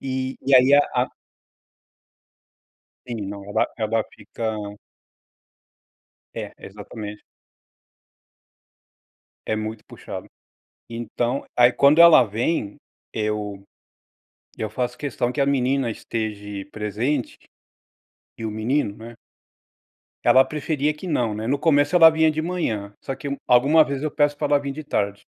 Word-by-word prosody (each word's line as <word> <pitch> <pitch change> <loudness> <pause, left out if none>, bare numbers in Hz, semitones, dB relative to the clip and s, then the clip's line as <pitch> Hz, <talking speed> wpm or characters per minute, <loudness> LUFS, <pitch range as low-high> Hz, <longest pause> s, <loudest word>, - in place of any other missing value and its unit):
E 130 0 -3
e 135 - +3
aí, 130 +2 +7
a 145 - +7 0.2
a - - -12 2.0
Sim. 115 -5 -5
Não. 100 -1 -7
ela 105 - 0
ela 110 -1 0
fica 110 -1 -5 1.8
É, - - -6
exatamente. 105 +1 -9 2.2
É 110 - 0
muito 110 0 -5
puxado. - - -9 0.6
Então, 120 +3 -2
aí 120 0 +6
quando 140 +5 +5
ela 170 -5 +9
vem, 110 +1 -2 0.4
eu 105 -2 -3 1.0
eu 110 - -3
faço 125 +2 -3
questão 125 -4 -2
que 145 - -5
a 140 - +3
menina 135 -2 +1
esteje 105 -3 -5
presente 110 +6 -2 1.0
e 115 - -6
o 110 - -2
menino, 110 +1 -1
né. 115 +1 -10 1.1
Ela 130 +2 +6
preferia 150 +1 -1
que 180 +5 -8
não, 120 -9 0
né, 110 +2 -4
no 140 +2 +1
começo 145 +1 +3
ela 165 -2 +9
vinha 160 0 +3
de 155 - -2
manhã, 115 - -3
só - - -5
que 140 - -7 0.2
alguma 140 +6 +5
vez 140 0 -4
eu 155 - -1
peço 145 -1 +1
pra - - -1
ela 145 0 +3
vim 140 -1 -4
de 155 +2 -8
tarde. 100 -7 -2
125 Hz, 130 wpm, -23 LUFS, 110-145 Hz, 2.2 s, ela